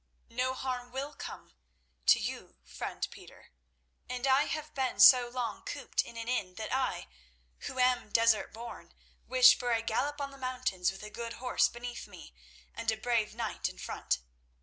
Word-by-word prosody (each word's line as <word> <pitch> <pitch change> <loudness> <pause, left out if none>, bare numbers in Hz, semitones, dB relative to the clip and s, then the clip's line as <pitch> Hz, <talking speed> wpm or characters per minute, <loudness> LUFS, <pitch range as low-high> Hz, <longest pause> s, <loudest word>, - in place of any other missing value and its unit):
"No 255 +2 0
harm 250 -2 -4
will 275 +3 -4
come—to - - -2
you, - - -5
friend 60 0 -4
Peter; - - -14 0.6
and 250 +1 -2
I 270 +2 +4
have 310 0 -4
been 260 -2 -1
so 250 -2 +9
long 245 -1 -3
cooped - - -2
in 235 - -11
an 230 0 -5
inn 195 -7 -1
that 220 +4 -4
I, 260 - -1 0.6
who - - -6
am 250 -3 +2
desert 230 0 +3
born, 235 +2 -10 0.3
wish - - +8
for 245 -1 -1
a 225 -1 +1
gallop 290 +6 -1
on 280 -1 -3
the 275 - -13
mountains 255 -9 -1
with 195 +2 -11
a 210 - -8
good 230 0 -5
horse 250 +2 +2
beneath 240 0 -7
me 60 - -13 0.4
and 230 - -2
a 220 - -3
brave 220 -2 0
knight 230 -2 -2
in - - -13
front. - - -2
245 Hz, 170 wpm, -31 LUFS, 220-260 Hz, 0.6 s, so